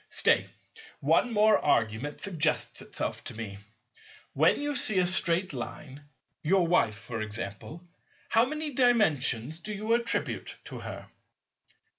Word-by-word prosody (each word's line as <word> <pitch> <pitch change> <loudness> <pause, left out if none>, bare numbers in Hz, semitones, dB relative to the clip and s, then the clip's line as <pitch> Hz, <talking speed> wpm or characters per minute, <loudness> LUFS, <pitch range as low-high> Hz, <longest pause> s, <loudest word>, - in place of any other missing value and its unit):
Stay; - - +3 0.5
one 245 - +2
more 215 0 +4
argument 115 +6 0
suggests 160 -6 0
itself - - -3
to - - -8
me. 105 -3 -6 0.7
When - - +3
you 290 0 -2
see 215 -5 +2
a 180 - +4
Straight 175 -1 +2
Line— 140 +3 -8 0.3
your 185 +3 +3
wife, 140 -11 +2
for 115 0 -6
example—how 115 - -3
many 305 +2 -4
Dimensions 160 - +2
do 215 - -6
you 215 +2 -1
attribute 235 0 -1
to - - -8
her? - - -8
170 Hz, 125 wpm, -28 LUFS, -, 0.7 s, more